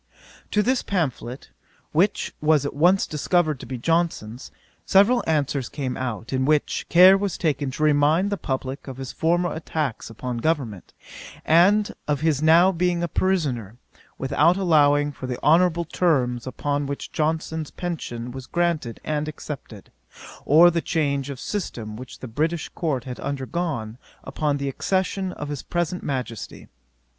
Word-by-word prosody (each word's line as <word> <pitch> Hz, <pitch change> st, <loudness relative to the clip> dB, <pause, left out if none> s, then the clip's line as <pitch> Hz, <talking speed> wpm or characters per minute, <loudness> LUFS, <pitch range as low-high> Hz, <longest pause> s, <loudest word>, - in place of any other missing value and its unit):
To 210 Hz, -, +2 dB
this 255 Hz, +2 st, +1 dB
pamphlet, 140 Hz, -8 st, -3 dB, 0.4 s
which 185 Hz, +6 st, +1 dB
was 155 Hz, -2 st, +3 dB
at -, -, -3 dB
once 175 Hz, +7 st, +3 dB
discovered 155 Hz, -1 st, 0 dB
to -, -, -9 dB
be 130 Hz, -, -4 dB
Johnson's, 145 Hz, -5 st, -1 dB, 0.3 s
several 205 Hz, +6 st, +4 dB
answers 145 Hz, -4 st, 0 dB
came 135 Hz, -4 st, -4 dB
out, 125 Hz, -1 st, -4 dB
in 130 Hz, 0 st, +1 dB
which, 150 Hz, +2 st, +1 dB
care 185 Hz, +2 st, +8 dB
was 195 Hz, -3 st, -2 dB
taken 145 Hz, -4 st, 0 dB
to 140 Hz, +4 st, -4 dB
remind 155 Hz, +6 st, +3 dB
the -, -, +1 dB
publick 130 Hz, -2 st, -4 dB
of 130 Hz, -2 st, -7 dB
his 135 Hz, -1 st, -6 dB
former 175 Hz, +2 st, +1 dB
attacks 155 Hz, -7 st, -3 dB
upon 120 Hz, +2 st, -5 dB
government, 125 Hz, -, -2 dB, 0.5 s
and 195 Hz, +6 st, +4 dB, 0.2 s
of 150 Hz, -1 st, 0 dB
his 155 Hz, -3 st, +1 dB
now 165 Hz, +4 st, +6 dB
being 175 Hz, -1 st, 0 dB
a -, -, 0 dB
pensioner, 140 Hz, -, -1 dB, 0.4 s
without 150 Hz, +6 st, +2 dB
allowing 145 Hz, -5 st, +3 dB
for 130 Hz, -2 st, -7 dB
the 125 Hz, -1 st, -3 dB
honourable 170 Hz, +2 st, +4 dB
terms 130 Hz, -8 st, 0 dB
upon 145 Hz, +2 st, -2 dB
which 140 Hz, 0 st, -5 dB
Johnson's 160 Hz, 0 st, -2 dB
pension 125 Hz, -9 st, -5 dB
was 130 Hz, 0 st, -8 dB
granted 170 Hz, -9 st, -1 dB
and 150 Hz, 0 st, -2 dB
accepted, 140 Hz, -9 st, -8 dB, 0.5 s
or 165 Hz, +5 st, +7 dB
the 170 Hz, 0 st, 0 dB
change 140 Hz, -5 st, -1 dB
of 135 Hz, -3 st, -6 dB
system 115 Hz, -, -4 dB
which 125 Hz, +2 st, -9 dB
the 130 Hz, -, -6 dB
British 155 Hz, +7 st, -2 dB
court 145 Hz, -8 st, -2 dB
had 125 Hz, -2 st, -7 dB
undergone 135 Hz, -4 st, -3 dB, 0.2 s
upon 145 Hz, +1 st, -1 dB
the 140 Hz, 0 st, -3 dB
accession 190 Hz, +6 st, -1 dB
of 145 Hz, -, -6 dB
his 145 Hz, -3 st, -4 dB
present 175 Hz, +1 st, -2 dB
Majesty. 125 Hz, -5 st, -5 dB
150 Hz, 150 wpm, -24 LUFS, 130-170 Hz, 0.5 s, care